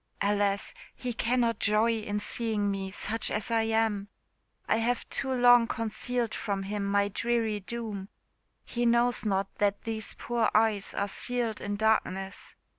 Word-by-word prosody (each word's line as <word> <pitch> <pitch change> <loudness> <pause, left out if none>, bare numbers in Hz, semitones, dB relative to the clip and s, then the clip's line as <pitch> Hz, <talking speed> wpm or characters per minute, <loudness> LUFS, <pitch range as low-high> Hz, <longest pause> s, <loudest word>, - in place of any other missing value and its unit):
"Alas! 200 0 +1 0.2
he 250 -1 -4
cannot 235 -1 +1
joy 215 +3 +4
in 210 -1 -3
seeing 210 -2 0
me, 195 -1 -3
such 215 +3 -1
as 210 +2 -3
I 225 -1 +3
am. 220 -2 +1 0.6
I - - +3
have 235 +1 0
too 265 - -2
long 245 -2 +6
concealed 230 +1 -2
from 200 -2 -2
him 205 +1 -3
my 200 0 +2
dreary 225 0 0
doom; 205 -2 -6 0.6
he 240 - -2
knows 235 -1 +2
not 195 -1 0
that 205 -1 +1
these 220 -2 -3
poor 235 -2 0
eyes 215 -2 +2
are 200 - 0
sealed 235 +1 -1
in 205 0 -2
darkness! 200 -3 0
220 Hz, 150 wpm, -29 LUFS, 205-235 Hz, 0.6 s, long